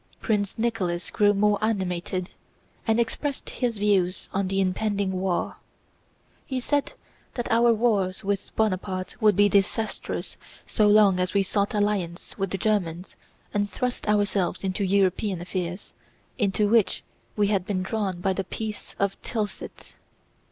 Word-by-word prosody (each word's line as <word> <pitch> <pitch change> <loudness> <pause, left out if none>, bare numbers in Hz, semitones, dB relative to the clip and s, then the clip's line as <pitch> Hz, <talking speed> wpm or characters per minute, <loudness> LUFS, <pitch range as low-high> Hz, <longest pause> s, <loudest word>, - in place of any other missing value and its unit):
Prince 205 -3 -1
Nicholas 200 -7 -1
grew 205 -1 +4
more 205 0 +2
animated 185 -3 -1 0.6
and 225 +1 +3
expressed 265 +4 -2
his 240 -4 -1
views 195 -3 +1
on 195 0 0
the 195 +1 0
impending 195 +1 0
war. 185 -1 -1 0.9
He 260 -2 -3
said 285 +3 0 0.4
that 240 - -3
our 235 +1 +5
wars 210 -5 +1
with 200 0 -1
Bonaparte 185 -3 -1
would 210 -1 +5
be 205 0 +5
disastrous 205 +2 -1 0.3
so 215 - +2
long 205 -3 +6
as 180 +2 -1
we 200 - +4
sought 200 +2 0
alliances 200 -4 -1
with 195 -2 -2
the 195 - -2
Germans 185 -4 -1 0.4
and 205 0 0
thrust 250 +2 -3
ourselves 205 -3 +1
into 190 +1 -1
European 195 0 +2
affairs, 180 +1 -4 0.5
into 205 -1 +2
which 220 -1 +3 0.3
we 205 -1 +2
had 200 -3 +1
been 185 -3 -1
drawn 195 -3 -2
by 190 +1 +1
the 195 - -2
Peace 215 +3 -6
of 200 0 -1
Tilsit. 215 -4 -5
200 Hz, 145 wpm, -26 LUFS, 185-215 Hz, 0.9 s, long